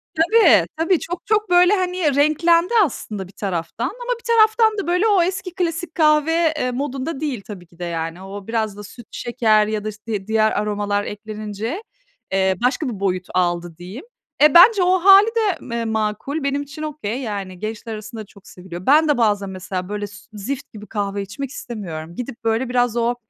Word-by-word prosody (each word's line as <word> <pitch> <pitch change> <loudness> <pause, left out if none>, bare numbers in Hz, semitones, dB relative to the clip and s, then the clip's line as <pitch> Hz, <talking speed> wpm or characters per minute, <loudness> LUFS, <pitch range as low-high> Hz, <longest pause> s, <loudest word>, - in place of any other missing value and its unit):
Tabii, 385 +8 +5
tabii 335 +2 +2
çok 350 +1 -6
çok 425 -1 +1
böyle, 355 +2 +5
hani, 360 -6 0
renklendi 335 +6 +3
aslında 210 - -4
bir - - -16
taraftan 185 +1 -3
ama - - -6
bir - - -23
taraftan 440 0 +4
da 400 - -3
böyle 360 +5 +2
o 405 -4 +4
eski 370 0 -3
klasik 340 -2 -3
kahve, 315 +1 +3
eee, 250 - 0
modunda 270 +3 -4
değil 280 -8 -3
tabii 185 -5 -9
ki 170 +1 -24
de, - - -5
yani. 165 +1 -4
O 195 +1 -9
biraz 220 -3 -2
da 205 - -8
süt, 230 +2 -13
şeker 220 -3 +2
ya 215 -1 -2
da 215 - -3
işte 210 0 -13
di 195 -2 -4
diğer 220 0 +2
aromalar 205 -1 -1
eklenince, 215 - -6 0.5
eee, 190 0 +2
başka 260 +3 +1
bir 215 -5 -6
boyut 185 -2 -1
aldı 175 -2 -1
diyeyim. 190 - -9 0.4
Eee, 300 -1 +7
bence 380 +3 +8
o 365 +1 +3
hâli 390 +3 +7
de 425 -6 +1
me 235 -1 -4
makul. 220 +7 -2
Benim 280 +1 0
için 285 +1 -9
okay, 275 -7 -4
yani, 200 -7 -5
gençler 220 +2 -5
arasında 215 +1 -8
çok 200 -1 -19
seviliyor. 180 0 -10
Ben 305 +4 +5
de 295 - +2
bazen 205 -4 +1
mesela 185 0 -5
böyle 205 0 -3
s 205 - -14 0.2
zift 260 +8 -6
gibi 210 -1 -10
kahve 200 -1 -3
içmek 210 +8 -6
istemiyorum. 170 - -7
Gidip 245 +1 -7
böyle 230 +3 0
biraz 245 -2 +1
o 235 +1 +1
235 Hz, 190 wpm, -21 LUFS, 205-325 Hz, 0.5 s, bence